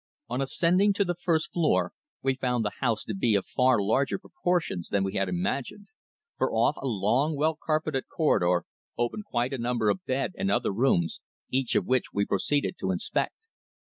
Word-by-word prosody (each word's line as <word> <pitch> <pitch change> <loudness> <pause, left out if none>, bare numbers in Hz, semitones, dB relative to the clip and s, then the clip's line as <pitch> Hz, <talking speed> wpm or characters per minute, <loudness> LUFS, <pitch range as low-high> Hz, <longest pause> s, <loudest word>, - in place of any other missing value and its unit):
On 125 +3 -1
ascending 180 +8 +3
to 200 0 +1
the 175 - 0
first 170 -2 -1
floor 170 -3 +2 0.3
we 135 0 +2
found 125 -3 -1
the 105 - 0
house 115 -4 0
to 110 - -4
be 105 +2 +2
of 100 - +1
far 125 -3 +3
larger 110 +7 +1
proportions 175 - -2
than 100 -1 +1
we 95 0 -2
had 95 -1 0
imagined, 120 - -3 0.5
for 130 - +1
off 115 +6 +2
a 135 - -4
long, 120 +8 +1
well 155 +2 +1
carpeted 155 -3 -1
corridor 90 - +2 0.3
opened 120 - -2
quite 125 - -1
a 135 - -3
number 120 -3 +1
of 185 - -4
bed 130 +5 -1
and 95 - 0
other 100 - +1
rooms, 95 -8 +1 0.3
each 130 -2 0
of - - +2
which 130 -1 +2
we 100 0 0
proceeded 140 +10 0
to 95 - -2
inspect. 130 - -2
130 Hz, 185 wpm, -27 LUFS, 105-155 Hz, 0.5 s, ascending